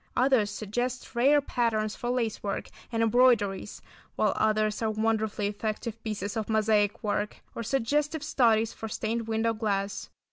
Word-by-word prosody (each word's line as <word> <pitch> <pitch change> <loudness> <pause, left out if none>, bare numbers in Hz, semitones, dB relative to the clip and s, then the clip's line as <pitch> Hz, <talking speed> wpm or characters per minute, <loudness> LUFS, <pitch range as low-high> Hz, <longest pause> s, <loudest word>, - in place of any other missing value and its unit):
Others 250 -5 +3
suggest 240 +5 -3
rare 280 +5 +5
patterns 225 -5 0
for 240 - -4
lace 240 -3 -1
work 200 -1 -3 0.2
and 230 -1 +1
embroideries, 225 -4 +2 0.3
while - - +2
others 215 0 +1
are 220 - +1
wonderfully 220 -1 0
effective 215 +2 -3
pieces 205 -2 -3
of 220 -1 -3
mosaic 215 0 +2
work, 210 0 -2
or - - -5
suggestive 285 +6 0
studies 230 -6 +2
for 220 - -6
stained 225 +1 -2
window 225 0 +1
glass. 205 -2 -2
220 Hz, 145 wpm, -28 LUFS, 210-240 Hz, 0.3 s, rare